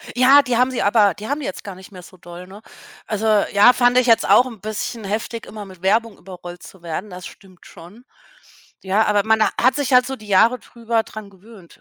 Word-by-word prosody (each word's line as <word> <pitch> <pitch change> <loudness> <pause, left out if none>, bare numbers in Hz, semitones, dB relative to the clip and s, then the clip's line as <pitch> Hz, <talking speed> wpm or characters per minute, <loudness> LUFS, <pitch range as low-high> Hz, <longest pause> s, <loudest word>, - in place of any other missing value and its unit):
Ja, 260 +3 +6
die 250 -4 -2
haben 255 +1 +2
sie 255 - -3
aber 205 -2 +3
die 210 +4 -10
haben 285 +2 -3
die 285 - -7
jetzt 185 - -7
gar 200 -2 -9
nicht 190 +2 -15
mehr 185 -2 -12
so 185 - -17
doll, 175 +1 -12
ne? 200 +3 -14 0.5
Also 220 +1 -3 0.3
ja, 205 +5 +6
fand 245 0 +2
ich 255 0 +2
jetzt 230 -1 +3
auch 250 - +5
'n 230 -5 -10
bisschen 215 +1 -6
heftig, 225 +3 -5
immer 210 -1 -10
mit 185 -2 -15
Werbung 220 +3 0
überrollt 175 -1 -12
zu 190 - -15
werden, 175 +5 -6
das 180 -1 -10
stimmt 185 -2 -19
schon. 200 +9 -15 0.8
Ja, 200 +3 +1
aber 205 -1 +1
man 220 0 +2 0.2
hat 255 +2 +3
sich 275 -3 -2
halt 250 0 +4
so 265 - -5
die 215 -4 -15
Jahre 225 +6 +3
drüber 230 -1 -3
dran 215 -2 -11
gewöhnt. 195 -2 -18
215 Hz, 230 wpm, -19 LUFS, 190-240 Hz, 0.8 s, Ja